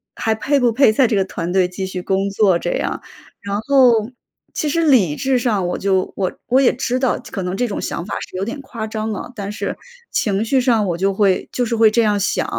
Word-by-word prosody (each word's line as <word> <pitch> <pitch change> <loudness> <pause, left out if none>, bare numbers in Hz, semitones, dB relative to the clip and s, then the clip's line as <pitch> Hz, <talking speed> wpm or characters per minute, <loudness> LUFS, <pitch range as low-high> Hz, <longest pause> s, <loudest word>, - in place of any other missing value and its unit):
还 220 -1 0
配 280 +6 +1
不 245 -2 +3
配 255 -1 +5
在 250 +3 +3
这 220 - 0
个 195 - +2
团 175 -2 -5
队 185 -1 +3
继 190 +1 -4
续 185 -1 -5
工 195 +2 0
作， 195 -3 +2
这 175 - -2
样。 - - -2 0.4
然 200 0 -3
后 245 -3 +3 0.4
其 305 - -2
实 335 +3 +1
理 215 - +4
智 265 - +1
上 215 -7 0
我 175 - -2
就 190 -1 0
我 190 -2 0 0.2
我 255 +2 +3
也 270 - +3
知 255 0 -1
道， 260 -1 +1
可 195 - -4
能 180 0 -3
这 245 +4 0
种 200 - -4
想 170 - -4
法 205 - -6 0.2
是 - - -13
有 190 - -2
点 235 +8 -5
夸 230 -5 -6
张 220 0 -4
了， 215 +4 -6
但 200 -2 -5
是， 210 - -4 0.3
情 200 -1 0
绪 260 +4 +2
上， 235 -4 +2
我 170 -2 -1
就 195 +2 +1
会 195 -2 +1
就 245 - 0
是 235 - -1
会 220 -1 +6
这 235 +2 +2
样 210 -2 +2
想。 200 - 0
215 Hz, 260 characters per minute, -19 LUFS, 195-245 Hz, 0.4 s, 会